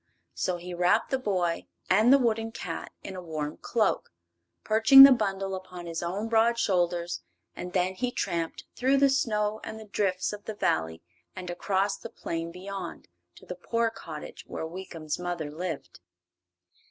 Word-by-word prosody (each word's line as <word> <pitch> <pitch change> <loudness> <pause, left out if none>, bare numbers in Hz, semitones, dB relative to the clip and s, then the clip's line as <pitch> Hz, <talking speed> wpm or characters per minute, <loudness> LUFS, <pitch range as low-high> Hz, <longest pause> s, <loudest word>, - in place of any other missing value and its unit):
So 180 -1 -1
he 175 +1 -8
wrapped 180 +7 +2
the 265 - +1
boy 180 -8 -1 0.2
and 215 +6 +5
the 275 - +9
wooden 225 -3 0
cat - - -6
in 190 - -7
a 185 - -6
warm 155 -3 -4
cloak, 220 -4 0 0.5
perching 225 +5 +9
the 275 - +11
bundle 195 -5 0
upon 185 -2 -7
his 165 -1 -4
own 190 +6 -2
broad 230 +1 +3
shoulders, 175 - 0 0.3
and 180 0 -7
then 185 0 +1
he 245 +5 -2
tramped 165 -7 -2
through 265 +3 +3
the 275 0 +5
snow 215 -5 0
and 220 - -6
the 220 - -10
drifts 195 -2 -1
of 205 0 -9
the 220 - -5
Valley 80 - -1 0.3
and 180 -1 -5
across 195 +2 0
the 230 - -9
plain 165 -4 -4
beyond 190 +2 -7 0.3
to - - -15
the - - -5
poor 230 -1 -1
cottage - - -9
where - - -4
Weekum's 165 -3 -5
mother 175 -4 -3
lived. 165 -1 -5
190 Hz, 165 wpm, -28 LUFS, 175-220 Hz, 0.5 s, the